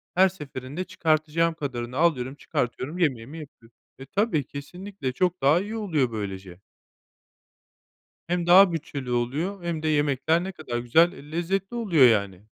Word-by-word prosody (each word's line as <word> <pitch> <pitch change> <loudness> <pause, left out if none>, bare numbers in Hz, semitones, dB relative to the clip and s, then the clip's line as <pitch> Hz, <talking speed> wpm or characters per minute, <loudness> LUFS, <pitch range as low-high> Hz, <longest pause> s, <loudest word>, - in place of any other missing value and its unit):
her 190 +1 +6
seferinde 145 -2 -7
çıkartacağım 165 -2 +1
kadarını 125 -5 -5
alıyorum, 140 -5 +1
çıkartıyorum, 130 +5 -3
yemeğimi 145 -2 -1
yapıyorum. 120 -6 -14 0.2
E, 135 - -9
tabii, 175 - 0
kesinlikle 145 +2 -6
çok 180 +5 0
daha 150 +6 +4
iyi 210 +3 -5
oluyor 155 - 0
böylece. 95 -4 -6 1.7
Hem 175 0 -1
daha 185 +1 +8
bütçeli 140 -5 -5
oluyor 150 +11 -2
hem 165 -2 -3
de - - 0
yemekler 150 +2 +1
ne 190 - -4
kadar 155 -9 -5
güzel, 160 +9 +4
eee, 150 -4 -13
lezzetli 190 +6 -2
oluyor, 170 - +5
yani. 100 -4 0
155 Hz, 145 wpm, -25 LUFS, 130-175 Hz, 1.7 s, daha